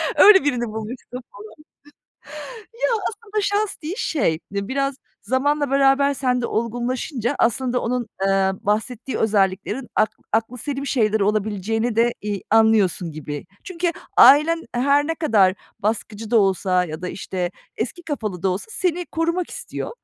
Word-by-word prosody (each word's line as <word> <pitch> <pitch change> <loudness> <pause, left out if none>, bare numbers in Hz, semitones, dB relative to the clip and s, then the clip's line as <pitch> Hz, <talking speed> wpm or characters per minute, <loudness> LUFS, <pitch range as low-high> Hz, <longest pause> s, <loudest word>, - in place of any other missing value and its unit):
Öyle 390 -4 +8
birini 250 -5 0
bulmuşsun, 220 +4 -7 0.2
falan. - - -14 1.4
Ya, 485 - 0 0.2
aslında 430 -1 -4
şans 410 +1 0
değil, 325 +5 -3
şey, 165 - 0
biraz 265 +8 -1 0.3
zamanla 285 +2 0
beraber 275 +1 +4
sende 250 -3 0
olgunlaşınca 240 +3 -2
aslında 245 +2 +1
onun, 240 -1 -2 0.2
eee, 195 0 +3
bahsettiği 230 +5 -2
özelliklerin 210 +3 0
ak 215 0 +3 0.2
aklıselim 250 +5 -2
şeyler 220 -5 +1
olabileceğini 215 +2 0
de, 235 +1 +3
iii, 205 -2 -3
anlıyorsun 210 -6 +3
gibi. 150 0 -6 0.2
Çünkü 345 -1 -2 0.2
ailen 300 +6 +7
her 280 +4 +3
ne 325 - -1
kadar 210 - +3 0.2
baskıcı 215 +1 -3
da 235 - +5
olsa 190 -2 +2
ya 155 0 -7
da, 180 - -3
işte, 180 -2 -4 0.3
eski 345 - -4
kafalı 215 - -4
da 190 - +2
olsa 185 - -2
seni 355 -4 -1
korumak 335 +2 -1
istiyor, - - -6
240 Hz, 135 wpm, -22 LUFS, 205-285 Hz, 1.4 s, Öyle